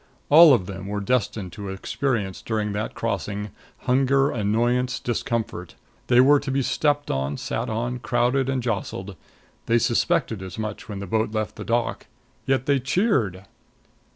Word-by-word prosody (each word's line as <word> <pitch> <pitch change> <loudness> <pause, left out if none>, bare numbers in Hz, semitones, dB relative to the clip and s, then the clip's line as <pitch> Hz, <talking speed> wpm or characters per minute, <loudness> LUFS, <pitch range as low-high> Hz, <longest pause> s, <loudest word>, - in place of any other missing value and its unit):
All 160 +1 +9
of 120 -9 +3
them 95 0 -7
were 105 0 -2
destined 105 -3 -1
to 100 -2 -6
experience 100 0 -2
during 110 -2 -2
that 110 +2 -3
crossing 105 -2 -3 0.3
hunger, 135 +2 +2
annoyance, 120 +4 0
discomfort. 115 -6 -3 0.3
They 120 -1 +5
were 140 +3 +6
to 140 0 -6
be 135 0 +1
stepped 145 +2 0
on, 70 +1 -2
sat - - -3
on, 120 +3 -2
crowded 125 +2 +1
and 130 -2 -1
jostled. 100 -3 -3 0.5
They 115 - +4
suspected 115 -2 +1
as 95 0 -8
much 110 -1 -5
when 100 -2 -5
the - - -4
boat 110 +3 -1
left 110 -1 -2
the - - -7
dock. 115 0 -1 0.4
Yet 135 -1 +1
they 140 -2 +2
cheered! 125 - 0
115 Hz, 155 wpm, -24 LUFS, 100-130 Hz, 0.5 s, All